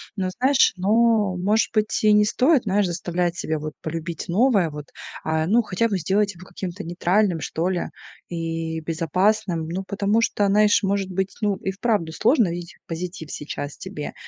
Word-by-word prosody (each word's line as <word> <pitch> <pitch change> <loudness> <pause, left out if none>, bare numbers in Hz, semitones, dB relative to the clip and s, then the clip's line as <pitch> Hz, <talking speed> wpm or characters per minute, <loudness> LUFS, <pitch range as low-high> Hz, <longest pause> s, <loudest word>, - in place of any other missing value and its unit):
Но, 190 -3 -1
знаешь, 265 +2 +4
ну, 210 0 +3
может 210 +4 +2
быть, 215 -1 +1
и 215 -1 +6
не 210 0 +6
стоит, 260 +5 +3
знаешь, 200 -1 +2
заставлять 175 0 -1
себя 155 -2 -2
вот 155 0 -5
полюбить 165 0 -4
новое 200 -2 +3
вот, 150 -1 -8 0.4
а, 160 0 0
ну, 235 +4 +4
хотя 220 +3 0
бы 200 - 0
сделать 200 +4 +1
его 180 +1 -13
каким-то 185 +1 -6
нейтральным, 175 +1 +1
что 165 +4 -2
ли, 180 -2 -1 0.5
и 165 -1 -3
безопасным. 170 +2 0
Ну, 185 +4 -3
потому 205 +3 +1
что, 205 -2 +1
знаешь, 210 +1 +4
может 195 -1 0
быть, 190 +1 -2
ну, 205 -2 +1
и 190 - -3
вправду 200 -5 0
сложно 230 - +3
видеть 170 0 -6
позитив 170 -1 -6
сейчас 145 0 -5
тебе. 150 - -6
190 Hz, 170 wpm, -23 LUFS, 165-210 Hz, 0.5 s, и